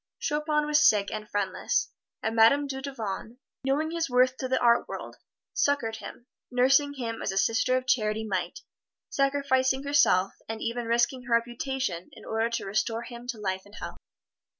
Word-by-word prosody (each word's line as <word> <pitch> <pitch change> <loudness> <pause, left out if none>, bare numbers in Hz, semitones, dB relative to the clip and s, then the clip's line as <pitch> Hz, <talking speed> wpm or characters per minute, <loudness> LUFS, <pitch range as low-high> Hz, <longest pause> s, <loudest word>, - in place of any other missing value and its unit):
Chopin 300 0 0
was 300 0 +6
sick 200 -2 +1
and 215 0 -6
friendless, 200 -2 -1 0.3
and 225 +1 -1
Madame 235 +6 +5
Dudevant, 265 -5 -5 0.3
knowing 290 +4 0
his 330 -3 -1
worth 255 +1 +4
to 260 - -3
the 260 0 +1
art 235 0 +4
world, - - -7 0.4
succored 235 -6 +1
him 240 - -10 0.2
nursing 270 +3 +3
him 230 -4 -4
as - - -1
a 195 - -4
Sister 225 +5 +2
of 255 - -3
Charity 220 -3 +1
might, 195 - -3 0.5
sacrificing 275 -1 +1
herself, 195 -10 +3 0.2
and 225 0 -4
even 235 +1 -3
risking 240 +2 +1
her 235 -1 +3
reputation 240 - -2
in - - -13
order 225 +1 0
to 230 - -3
restore 225 +3 -1
him 240 0 -10
to 245 -2 -3
life 190 -2 -2
and 205 +1 -16
health. - - -7
240 Hz, 170 wpm, -28 LUFS, 220-270 Hz, 0.5 s, was